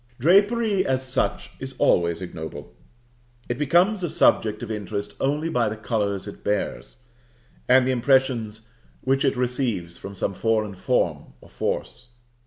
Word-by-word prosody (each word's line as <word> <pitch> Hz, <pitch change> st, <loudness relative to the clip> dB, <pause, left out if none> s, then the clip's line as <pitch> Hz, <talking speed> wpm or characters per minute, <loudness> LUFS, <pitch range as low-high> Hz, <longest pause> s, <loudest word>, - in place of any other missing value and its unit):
Drapery, 200 Hz, -, +3 dB
as 130 Hz, 0 st, -1 dB
such, 125 Hz, -, -1 dB
is -, -, -7 dB
always 85 Hz, +1 st, +2 dB
ignoble; 80 Hz, -3 st, -8 dB, 0.7 s
it 120 Hz, +2 st, -3 dB
becomes 175 Hz, +8 st, +3 dB
a 175 Hz, -, -1 dB
subject 110 Hz, -5 st, +2 dB
of 115 Hz, -, -5 dB
interest 105 Hz, -1 st, -4 dB
only 145 Hz, +4 st, 0 dB
by 120 Hz, -9 st, +1 dB
the 110 Hz, -, -5 dB
colors 105 Hz, -3 st, -2 dB
it 100 Hz, -, -10 dB
bears, 105 Hz, 0 st, -2 dB, 0.7 s
and 130 Hz, 0 st, +6 dB
the 130 Hz, -, +1 dB
impressions 120 Hz, -4 st, +1 dB, 0.3 s
which 135 Hz, +1 st, +1 dB
it -, -, +1 dB
receives 120 Hz, -9 st, -1 dB
from 100 Hz, 0 st, -8 dB
some 100 Hz, +1 st, -2 dB
foreign 110 Hz, 0 st, 0 dB
form 90 Hz, -7 st, -1 dB
or -, -, -17 dB
force. 120 Hz, -1 st, -4 dB
120 Hz, 145 wpm, -24 LUFS, 105-135 Hz, 0.7 s, and